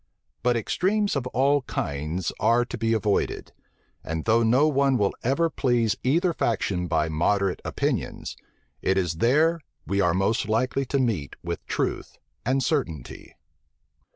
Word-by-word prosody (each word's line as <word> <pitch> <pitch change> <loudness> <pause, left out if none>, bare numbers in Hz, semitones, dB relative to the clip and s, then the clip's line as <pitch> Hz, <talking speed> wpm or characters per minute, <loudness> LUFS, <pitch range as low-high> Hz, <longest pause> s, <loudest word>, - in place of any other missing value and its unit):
But 120 -1 +2
extremes 200 - 0
of 130 -2 -1
all 140 +3 +2
kinds 80 - -3
are 120 +1 +3
to - - -6
be 115 0 -1
avoided; 105 -2 -1 0.5
and 80 0 -4
though 115 +1 +4
no 125 +6 +4
one 140 -3 +2
will 100 -3 +1
ever 140 +7 +2
please 120 -8 +1
either 170 +7 +2
faction 95 - -1
by 80 -1 +1
moderate 95 +4 0
opinions, - - -2 0.5
it 95 +1 +1
is 85 -4 0
there 155 - +3 0.3
we 100 0 0
are 90 -2 +2
most 100 +3 +1
likely 130 +5 +1
to 140 - 0
meet 110 - -1
with - - -4
truth - - -2 0.3
and 130 +2 +1
certainty. 105 - -3
115 Hz, 145 wpm, -25 LUFS, 95-135 Hz, 0.5 s, though